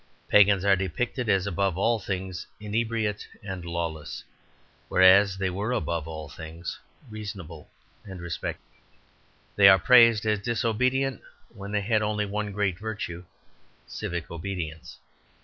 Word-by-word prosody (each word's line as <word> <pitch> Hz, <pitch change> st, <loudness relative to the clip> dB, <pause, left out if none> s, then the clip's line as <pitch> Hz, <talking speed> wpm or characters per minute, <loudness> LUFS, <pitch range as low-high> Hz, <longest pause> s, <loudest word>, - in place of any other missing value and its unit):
Pagans 100 Hz, -2 st, +5 dB
are 100 Hz, -1 st, +5 dB
depicted 115 Hz, -, -2 dB
as 95 Hz, -2 st, +3 dB
above 95 Hz, -1 st, 0 dB
all 115 Hz, +4 st, +2 dB
things 95 Hz, -2 st, -5 dB
inebriate 110 Hz, 0 st, -2 dB, 0.2 s
and 95 Hz, -3 st, -6 dB
lawless, 85 Hz, -3 st, -4 dB, 0.7 s
whereas 95 Hz, +1 st, +6 dB
they 95 Hz, -1 st, -1 dB
were 100 Hz, +6 st, -2 dB
above 85 Hz, -10 st, -2 dB
all 80 Hz, -1 st, -7 dB
things 80 Hz, +3 st, -8 dB, 0.3 s
reasonable 95 Hz, -7 st, -8 dB, 0.3 s
and 95 Hz, -4 st, -9 dB
respectable. 85 Hz, -1 st, -5 dB, 0.9 s
They 100 Hz, -1 st, +8 dB
are 95 Hz, -, +8 dB
praised 115 Hz, +1 st, +6 dB
as 105 Hz, -1 st, +1 dB
disobedient 120 Hz, +3 st, 0 dB, 0.3 s
when 100 Hz, +1 st, -8 dB
they 105 Hz, -1 st, 0 dB
had 110 Hz, +1 st, +1 dB
only 105 Hz, 0 st, 0 dB
one 105 Hz, +1 st, -3 dB
great 95 Hz, -3 st, -1 dB
virtue 100 Hz, -5 st, -5 dB, 0.6 s
civic 85 Hz, -1 st, -5 dB
obedience. 85 Hz, -2 st, -6 dB
100 Hz, 130 wpm, -26 LUFS, 90-105 Hz, 0.9 s, They